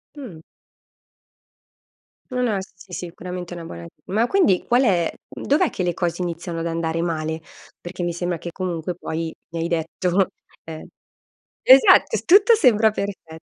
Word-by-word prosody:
Mh. 245 - -9 1.9
No 250 0 -1
no 225 -4 +1
eh - - -3
si 180 -1 -14
sicuramente 180 0 -6
una 170 - -7
buona 85 - -9 0.2
ma 220 +5 +1
quindi 220 - +3
qual 245 +2 +3
è 175 -7 +2 0.2
dov'è 305 +4 0
che - - -4
le 175 -2 -1
cose 175 0 -2
iniziano 170 -1 -4
ad 165 - -2
andare 165 0 -2
male? 160 -1 -2 0.4
Perché 175 +1 -6
mi 175 -1 -1
sembra 175 0 -2
che 170 +1 -7
comunque 175 -1 -3
poi 165 -1 -5
mi 165 - -5
hai 165 - -1
detto, 175 +3 0 0.4
ehm 160 -1 -8 0.8
esatto, 265 +1 +6
tutto 405 +6 +6
sembra 225 - +4
perfe 190 -6 -6
175 Hz, 150 wpm, -22 LUFS, 165-205 Hz, 1.9 s, esatto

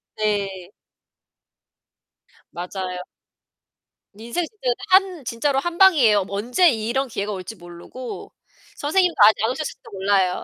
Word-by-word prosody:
네. 200 -4 -2 1.8
맞아요. 180 0 -5 1.1
인생 235 +11 -3
진짜 430 - -18
근데 245 -1 +1
한 370 -6 +3
진짜로 265 +4 0
한 345 +4 -4
방이에요. 255 - +5
뭐 200 +1 -5
언제 250 - +3
이런 240 +2 -1
기회가 210 -3 -4
올지 190 +2 -6
모르고 175 +8 -9 0.5
선생님도 355 +4 +1
아직 215 +1 +5
안 225 - +2
오셨을지도 255 -4 -6
몰라요. 190 -2 +1
225 Hz, 270 characters per minute, -22 LUFS, 195-290 Hz, 1.8 s, 방이에요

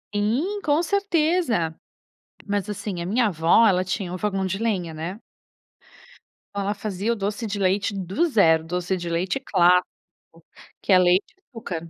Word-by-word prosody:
Sim, 265 - 0
com 300 +1 +2
certeza. 335 - 0 0.7
Mas, 205 -1 -2
assim, 200 -3 -4
a 170 - -5
minha 230 +5 +2
avó, 170 +4 +4
ela 185 -3 +3
tinha 185 -1 -3
um 180 - -4
fogão 195 -1 -1
de 190 +1 -2
lenha, 190 -8 -2
né? 170 +7 -6 1.4
Oh, - - -2
ela 200 +1 -1
fazia 205 +1 -3
o - - -4
doce 205 +2 -3
de 205 -1 -3
leite 195 +1 +1
do 195 - 0
zero. 165 - +4
Doce 180 +3 -2
de 175 -1 -5
leite 180 +8 -1
clássico, 180 -8 +3 1.0
que - - -2
é - - +8
leite 180 +2 +2
e - - -37
açúcar. 175 -9 -6
195 Hz, 165 wpm, -23 LUFS, 180-225 Hz, 1.4 s, é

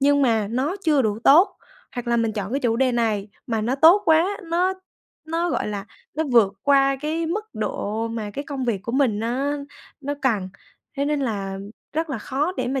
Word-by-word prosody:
nhưng 285 +1 +4
mà 220 -5 +2
nó 270 - -1
chưa 295 -4 +4
đủ 215 -1 0
tốt, 330 +8 +6 0.4
hoặc 245 -1 -5
là 235 - +2
mình 225 -1 +1
chọn 205 +1 -4
cái 280 - 0
chủ 230 -2 +1
đề 255 0 +2
này 215 -4 0 0.2
mà 225 -3 -1
nó 240 +5 0
tốt 335 +8 +6
quá 335 +5 +3
nó 355 +3 +1 0.5
nó, 335 +2 -1
gọi - - -1
là, 205 0 -4 0.3
nó 315 +2 0
vượt 210 -5 +5
qua 275 -1 +4
cái 320 +2 -1
mức 415 +6 -2
độ 220 +2 -2
mà 220 -2 -4
cái 280 +7 -5
công 275 -3 -4
việc 220 -6 -1
của 235 - -5
mình 255 -6 +2
nó 265 +6 -1 0.4
nó 285 +1 -3
cần. 210 -8 +1 0.5
Thế 280 - 0
nên 295 -1 0
là 195 -6 -2 0.3
rất 320 0 -2
là 260 - -2
khó 285 - -1
để - - -1
mà 265 0 -1
265 Hz, 210 wpm, -23 LUFS, 225-300 Hz, 0.5 s, tốt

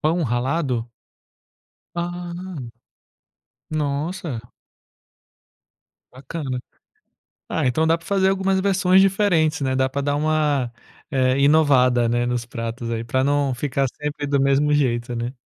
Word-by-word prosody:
Pão 165 +2 +1
ralado? 125 -1 -1 1.0
Ah. 175 0 -4 1.4
Nossa. 150 -2 -2 1.7
Bacana. 130 -1 -5 0.9
Ah, 160 - 0
então 145 +6 +2
dá 165 +1 +3
para 165 - -17
fazer 195 -1 +2
algumas 190 0 +1
versões 190 -1 +4
diferentes, 180 -6 +2
né, 130 -1 0
dá 130 0 +2
para 140 +2 -3
dar 145 +1 0
uma, 150 -5 +1 0.4
eh, 130 -1 +2
inovada, 135 -5 +4
né, 120 +1 +1
nos 120 -1 -2
pratos 115 0 -5
aí, 115 0 -2
para 130 +3 0
não 140 -1 +1
ficar 135 +1 -1
sempre 150 0 -3
do 140 -1 +1
mesmo 140 +2 +3
jeito, 125 -4 +1
né. 120 +3 -3
140 Hz, 125 wpm, -22 LUFS, 125-160 Hz, 1.7 s, versões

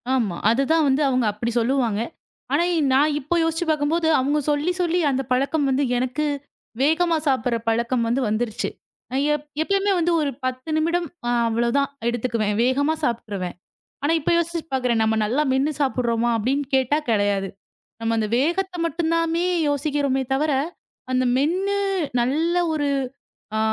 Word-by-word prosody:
ஆமா. 215 -9 0
அதுதான் 275 +7 +2
வந்து 270 +2 +2
அவங்க 255 -2 +1
அப்படி 230 +3 -3
சொல்லுவாங்க. 235 -3 +1 0.5
ஆனா 315 +4 +3 0.3
நான் 290 +3 +3
இப்போ 300 +5 -2
யோசிச்சு 325 +1 -1
பாக்கும்போது 315 +2 +1
அவங்க 285 +3 +1
சொல்லிச் 325 +5 -1
சொல்லி 350 0 +1
அந்தப் 270 -1 -2
பழக்கம் 280 +4 +1
வந்து 270 +2 +1
எனக்கு 255 +5 -1 0.6
வேகமா 320 +3 +3
சாப்டுற 250 -3 +1
பழக்கம் 235 +1 0
வந்து 240 +4 +1
வந்துருச்சு. 215 +1 -1 0.4
நான் 265 +2 0
எப் 295 0 -3 0.2
எப்பவுமே 395 +3 +1
வந்து 345 +1 +1
ஒரு 290 -2 0
10 255 +3 -4
நிமிடம் 335 +2 0 0.4
அவ்ளோதான் 235 +5 +1 0.2
எடுத்துக்குவேன். 230 -3 -1
வேகமா 280 +5 +2
சாப்டுருவேன். 210 -8 -2 0.5
ஆனா, 300 - +3
இப்ப 290 - -1
யோசிச்சு 340 0 0
பாக்குறேன். 250 -3 +1
நம்ம 220 0 +2
நல்லா 250 +8 +1
மென்னு 270 +4 +1
சாப்டுறோமா, 240 -4 0
அப்டின்னு 265 +6 0
கேட்டா 265 +2 +2
கேடையாது. 205 -3 +1 0.5
நம்ம 230 0 0
அந்த 215 -1 0
வேகத்த 350 +8 0
மட்டுந்தாமே 330 0 0 0.2
யோசிக்கிறோமே 285 -2 0
தவர, 300 +2 +1 0.6
அந்த 255 0 +2
மென்னு 370 +9 +1 0.4
நல்ல 310 +8 0 0.2
ஒரு 290 -2 0 0.7
அ - - +1
275 Hz, 140 wpm, -23 LUFS, 240-315 Hz, 0.7 s, ஆனா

